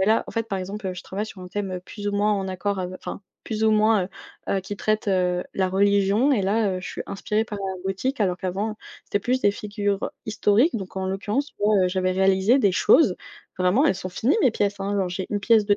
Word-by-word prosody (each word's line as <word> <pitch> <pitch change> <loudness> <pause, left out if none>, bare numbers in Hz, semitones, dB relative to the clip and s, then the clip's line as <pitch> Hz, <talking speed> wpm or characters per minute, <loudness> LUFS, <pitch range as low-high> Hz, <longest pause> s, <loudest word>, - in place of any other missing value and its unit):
mais 190 - +2
là, 220 +1 +3
en - - -9
fait, 230 -1 -2
par 195 - -2
exemple, 195 +2 -5
heu, 185 - -2
je 180 - -9
travaille 205 +3 -4
sur 205 - -11
un 180 - -8
thème, 195 +1 -4
heu, 185 - -3
plus 205 +3 -6
ou 205 - -2
moins 205 +1 +2
en 195 -2 -1
accord 190 +1 -2
ave 185 0 -4
enfin - - -7 0.2
plus 220 -1 -3
ou 220 - +5
moins, 215 -2 +4
heu - - -7 0.5
heu, - - 0
qui 195 +2 -6
traite, 215 +1 -1
heu, 180 -2 +1
la 190 -1 0
religion 200 +6 +3
et 240 - +2
là, 200 0 +1
heu, 185 - -5
je - - -7
suis - - -5
inspirée 210 +2 -1
par 210 -2 -6
la 190 -2 -4
boutique. 195 +8 -2
Alors 180 -2 0
qu'avant, 200 +4 -2 0.3
c'était 205 - -1
plus 255 +5 -1
des 205 - +5
figures 205 -1 -2
historiques, 215 +7 +2
donc 190 -3 -7
en 190 - -2
l'occurrence, 205 +9 -1
tu - - -29
vois, 210 +1 +3
heu, - - +2
j'avais 185 0 0
réalisé 190 +6 +3
des 200 -8 +3
choses. 205 - +4 0.4
Vraiment, 185 +10 +3
elles 295 - +3
sont 185 0 -5
finies, 235 - +1
mes 260 - +5
pièces, 200 -2 -1
hein. 200 +1 -1
Genre, 185 -2 0
j'ai 185 +1 -4
une 205 - -2
pièce 215 0 +4
de 205 -1 +4
200 Hz, 260 wpm, -24 LUFS, 190-215 Hz, 0.5 s, ou